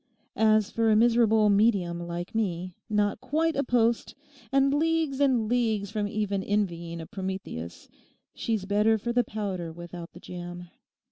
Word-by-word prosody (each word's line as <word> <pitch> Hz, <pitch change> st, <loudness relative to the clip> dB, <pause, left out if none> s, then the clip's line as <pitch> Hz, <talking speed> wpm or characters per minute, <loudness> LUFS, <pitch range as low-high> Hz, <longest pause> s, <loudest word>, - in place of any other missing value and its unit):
As 215 Hz, 0 st, +3 dB
for 230 Hz, -1 st, +1 dB
a 215 Hz, -, +5 dB
miserable 225 Hz, -2 st, +4 dB
"medium" 200 Hz, -5 st, +2 dB
like 175 Hz, +4 st, -5 dB
me, 185 Hz, -5 st, -2 dB, 0.2 s
not 210 Hz, -1 st, +1 dB
quite 320 Hz, +4 st, 0 dB
a 280 Hz, -, +1 dB
post 235 Hz, -2 st, +1 dB, 0.4 s
and 275 Hz, 0 st, +3 dB
leagues 315 Hz, -2 st, +1 dB
and 255 Hz, -6 st, +3 dB
leagues 220 Hz, -4 st, 0 dB
from 210 Hz, -1 st, -1 dB
even 205 Hz, -2 st, -1 dB
envying 170 Hz, -5 st, -2 dB
a 165 Hz, -, -6 dB
Prometheus, 190 Hz, -, -6 dB, 0.5 s
she's 220 Hz, -4 st, -2 dB
better 210 Hz, +2 st, +3 dB
for 235 Hz, +3 st, -3 dB
the 245 Hz, 0 st, +3 dB
powder 195 Hz, -7 st, -4 dB
without 175 Hz, 0 st, -9 dB
the -, -, -12 dB
jam. 175 Hz, 0 st, -8 dB
210 Hz, 150 wpm, -27 LUFS, 180-230 Hz, 0.5 s, a